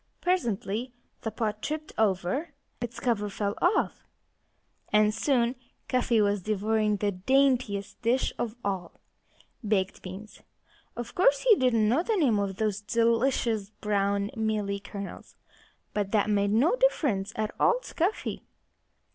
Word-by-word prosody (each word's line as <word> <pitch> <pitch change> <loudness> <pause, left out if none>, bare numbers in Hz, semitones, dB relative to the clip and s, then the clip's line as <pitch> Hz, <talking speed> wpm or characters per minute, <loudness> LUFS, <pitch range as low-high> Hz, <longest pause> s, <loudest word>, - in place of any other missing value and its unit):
Presently 240 - -1 0.3
the 220 - -2
pot 215 -1 -3
tipped 310 0 -4
over, 215 - 0 0.3
its 240 +1 -5
cover 210 -4 0
fell 200 0 -2
off, 360 +4 +1 0.9
and 210 0 +4
soon 240 -1 +1 0.3
Cuffy 245 -2 +2
was 205 -1 +2
devouring 215 +1 +1
the 205 +1 0
daintiest 240 -1 +1
dish 245 +3 +1
of 230 -1 -2
all! 185 -4 -3 0.6
Baked 200 -3 0
beans! 195 +4 -9 0.5
Of 240 -1 -6
course, 285 -6 +4
he 470 -4 +6
didn't 230 - +2
know 250 +9 +3
the 440 +5 0
name 260 - +3
of 200 -1 -2
those 210 0 -1
delicious, 230 -1 +1
brown, 200 -1 -1
mealy 215 -2 -1
kernels. 200 0 -8 0.6
But 205 -2 -1
that 210 0 +2
made 200 -1 +2
no 250 - +3
difference 240 - +1
at 215 0 -1
all 485 - +4
to - - -11
Cuffy. 360 +6 -1
215 Hz, 135 wpm, -28 LUFS, 200-250 Hz, 0.9 s, he